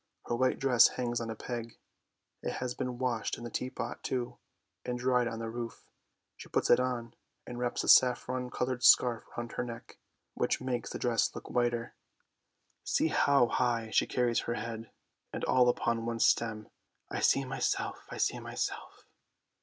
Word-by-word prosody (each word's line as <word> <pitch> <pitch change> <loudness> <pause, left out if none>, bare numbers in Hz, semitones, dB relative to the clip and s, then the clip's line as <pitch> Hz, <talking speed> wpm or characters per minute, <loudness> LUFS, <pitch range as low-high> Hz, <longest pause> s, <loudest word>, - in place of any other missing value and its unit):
Her 120 - -1
white 130 +2 +2
dress 130 -3 +6
hangs 120 -1 -1
on 115 - -4
a 110 - -4
peg; 115 0 -6 0.6
it - - -3
has 125 -1 -3
been 125 0 -4
washed 125 -3 -1
in 120 - -9
the 120 - -6
teapot, 130 +1 -4
too, 125 -2 -3 0.4
and 125 0 -3
dried 125 -1 +2
on 115 - -4
the 115 0 -4
roof. 115 0 -6 0.5
She - - -11
puts - - +1
it 120 - +7
on, 120 -2 -2 0.3
and 120 0 -7
wraps 120 -1 -1
a - - -5
saffron 125 0 +4
coloured 125 0 -2
scarf 120 -3 +6
round 120 0 -4
her - - -2
neck, 115 -1 -9 0.3
which - - 0
makes 125 -2 -3
the - - -5
dress 120 -2 +1
look - - -8
whiter. 120 -1 0 0.9
See 160 - +1
how 140 -4 +4
high 115 -2 0
she - - +3
carries 120 -2 +1
her 120 - -3
head, 115 0 -5 0.4
and - - -5
all 125 -1 +4
upon 115 -1 0
one 115 -1 -2
stem. 110 -2 +1 0.4
I - - -2
see 135 - +3
myself, 130 +1 -2
I - - -7
see - - 0
myself! - - -5
120 Hz, 175 wpm, -31 LUFS, 115-125 Hz, 0.9 s, it